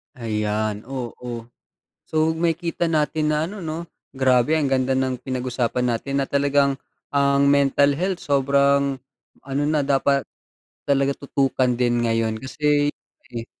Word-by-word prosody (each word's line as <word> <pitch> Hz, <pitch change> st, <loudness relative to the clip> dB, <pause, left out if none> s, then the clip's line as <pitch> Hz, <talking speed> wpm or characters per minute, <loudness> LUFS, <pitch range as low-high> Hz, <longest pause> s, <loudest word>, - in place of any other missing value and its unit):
Ayan 105 Hz, -2 st, -2 dB
oo. 120 Hz, -2 st, -6 dB, 0.7 s
So 155 Hz, 0 st, +1 dB
makikita 170 Hz, 0 st, 0 dB
natin 155 Hz, -1 st, +1 dB
na 155 Hz, +3 st, -1 dB
ano 210 Hz, -, -8 dB
'no, 165 Hz, -2 st, -4 dB, 0.3 s
grabe 130 Hz, +2 st, +3 dB
ang 145 Hz, -4 st, +1 dB
ganda 130 Hz, 0 st, +1 dB
ng 130 Hz, -1 st, 0 dB
pinag-usapan 125 Hz, -1 st, -1 dB
natin 135 Hz, +4 st, -1 dB
na 135 Hz, -, -2 dB
talagang 140 Hz, -1 st, +2 dB, 0.3 s
ang 140 Hz, 0 st, +3 dB
mental 140 Hz, 0 st, +4 dB
health 185 Hz, 0 st, -1 dB
sobrang 140 Hz, 0 st, +2 dB, 0.5 s
ano 140 Hz, +1 st, -2 dB
na 150 Hz, -1 st, +1 dB
dapat, 140 Hz, 0 st, +2 dB, 0.6 s
talaga 140 Hz, 0 st, +1 dB
tutukan 135 Hz, -2 st, 0 dB
din 120 Hz, -1 st, +2 dB
ngayon 115 Hz, -1 st, +1 dB
kasi, 145 Hz, +2 st, +1 dB, 0.4 s
eh 115 Hz, -1 st, -6 dB
140 Hz, 130 wpm, -22 LUFS, 125-145 Hz, 0.7 s, mental